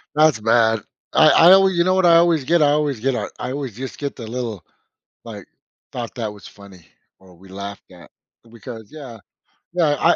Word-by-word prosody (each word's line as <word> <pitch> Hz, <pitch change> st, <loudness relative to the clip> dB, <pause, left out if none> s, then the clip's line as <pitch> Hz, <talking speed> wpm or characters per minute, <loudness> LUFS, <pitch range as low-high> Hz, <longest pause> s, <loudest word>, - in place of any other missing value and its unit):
That's 155 Hz, -5 st, +3 dB
bad. 115 Hz, 0 st, +2 dB, 0.3 s
I -, -, +6 dB
I 170 Hz, +2 st, +6 dB
always 190 Hz, -1 st, +4 dB
you 170 Hz, -, +3 dB
know 185 Hz, +1 st, +1 dB
what 190 Hz, -1 st, +2 dB
I 170 Hz, -1 st, +6 dB
always 165 Hz, -4 st, +2 dB
get? 170 Hz, +3 st, +2 dB
I 145 Hz, -1 st, +4 dB
always 145 Hz, -4 st, -1 dB
get 135 Hz, +1 st, 0 dB
a -, -, -4 dB
I 125 Hz, -, -5 dB
always 135 Hz, -5 st, -6 dB
just 130 Hz, +2 st, -8 dB
get 140 Hz, -1 st, -5 dB
the 115 Hz, -, -9 dB
little, 115 Hz, -5 st, -5 dB, 0.6 s
like -, -, -10 dB, 0.5 s
thought 120 Hz, -1 st, -7 dB
that 115 Hz, -4 st, -4 dB
was 105 Hz, -, -14 dB
funny 100 Hz, -5 st, -16 dB, 0.3 s
or 95 Hz, -2 st, -19 dB
we 95 Hz, +2 st, -18 dB
laughed 100 Hz, +1 st, -9 dB
at 90 Hz, -1 st, -16 dB, 0.4 s
because 115 Hz, -2 st, -11 dB
yeah, 135 Hz, -7 st, -11 dB, 0.5 s
yeah, 160 Hz, -5 st, +1 dB
I -, -, +3 dB
125 Hz, 200 wpm, -20 LUFS, 110-155 Hz, 0.6 s, I